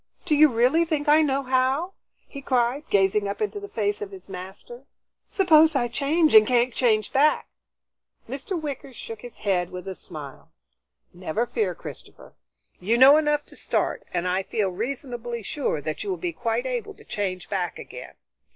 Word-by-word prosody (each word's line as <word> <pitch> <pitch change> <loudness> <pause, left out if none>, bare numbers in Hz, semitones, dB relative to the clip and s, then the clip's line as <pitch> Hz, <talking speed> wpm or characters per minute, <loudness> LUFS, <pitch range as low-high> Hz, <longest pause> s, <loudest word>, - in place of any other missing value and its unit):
Do 335 - +1
you 300 +1 +7
really 250 +8 +3
think 310 -3 -2
I 300 +2 +6
know 275 -2 +1
how?" 265 +7 +1 0.3
he 280 - -9
cried, 255 +2 0
gazing 200 +1 +2
up 200 - -4
into 420 -1 -2
the 405 - -8
face 205 -2 -1
of 205 - -4
his 195 -1 -12
master. 195 +7 -9 0.4
"Suppose 320 -5 +5
I 245 -3 +2
change 305 +4 +2
and 215 -1 +8
can't 245 0 +2
change 220 -5 +1
back?" 295 +3 +3 0.8
Mr. 380 -6 -4
Wicker 280 -3 -6
shook 225 -2 -8
his 245 -1 -11
head 180 -4 0
with 180 +1 -8
a 190 - -3
smile. 150 -7 -10 0.6
"Never 180 +5 -2
fear, 430 - -1
Christopher. - - -11 0.5
You 220 +6 +1
know 265 +3 +9
enough 295 -1 +1
to - - -14
start, - - -1
and 180 0 -1
I 185 +1 +1
feel 195 +1 -1
reasonably 240 +2 -5
sure 200 - -2
that 155 +2 -4
you 410 - -5
will 375 - -1
be 350 -2 -3
quite 235 -1 -2
able 250 -3 -4
to - - -17
change 185 -4 -3
back 180 -3 -2
again. - - -10
240 Hz, 180 wpm, -25 LUFS, 200-295 Hz, 0.8 s, know